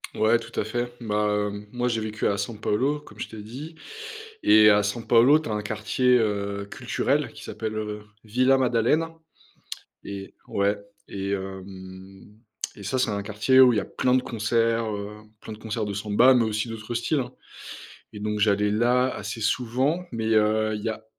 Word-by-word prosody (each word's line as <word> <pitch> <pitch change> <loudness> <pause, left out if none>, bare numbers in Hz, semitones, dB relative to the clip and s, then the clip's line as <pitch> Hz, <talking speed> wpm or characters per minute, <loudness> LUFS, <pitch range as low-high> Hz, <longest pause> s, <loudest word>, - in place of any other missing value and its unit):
Ouais, 110 +2 +4
tout 115 0 -6
à - - +1
fait. 120 +3 -3
Bah, 105 -2 0
hem, 100 0 -7
moi, 125 +1 -1
j'ai 115 -2 0
vécu 110 -1 -2
à 100 - 0
San 105 +2 -4
Paolo, 135 +9 0
comme 150 - -16
je - - -4
t'ai 110 -2 -8
dit 135 +10 -9 0.7
et 105 0 +7
à 105 0 +5
San 110 +3 -3
Paolo, 120 +6 +6
tu 155 - -6
as - - -2
un 105 - -2
quartier, 110 +4 +2
heu, 100 -2 -1
culturel - - -1
qui - - -12
s'appelle 110 0 -5 0.5
Vila 130 +5 +3
Madalena, 130 +7 +1 0.9
et 100 -1 -8
ouais 100 +1 +1 0.3
et 100 0 -4
hem 95 +1 -8 0.4
et 100 - -11
ça, 130 +7 -1
c'est 125 - +2
un 100 -1 -2
quartier 110 +5 +2
où 125 -2 +8
il - - +1
y - - +4
a - - -4
plein 125 - 0
de 130 - +4
concerts, 115 0 0
heu, 105 +1 -7 0.2
plein - - -9
de - - -10
concerts 110 0 -3
de 100 - -4
samba 105 +6 +4
mais 120 - +4
aussi 110 +1 -1
d'autres 115 +1 -6
styles, 135 +5 0
hein. 125 - -7 0.8
Et 105 - -8
donc 105 0 -2
j'allais 105 0 +3
là 125 +3 +2
assez 105 +2 -5
souvent, 130 - 0
mais 115 -2 -3
heu, 110 0 +2
il 105 - -5
y - - -1
a 110 0 -5
110 Hz, 195 wpm, -25 LUFS, 105-120 Hz, 0.9 s, où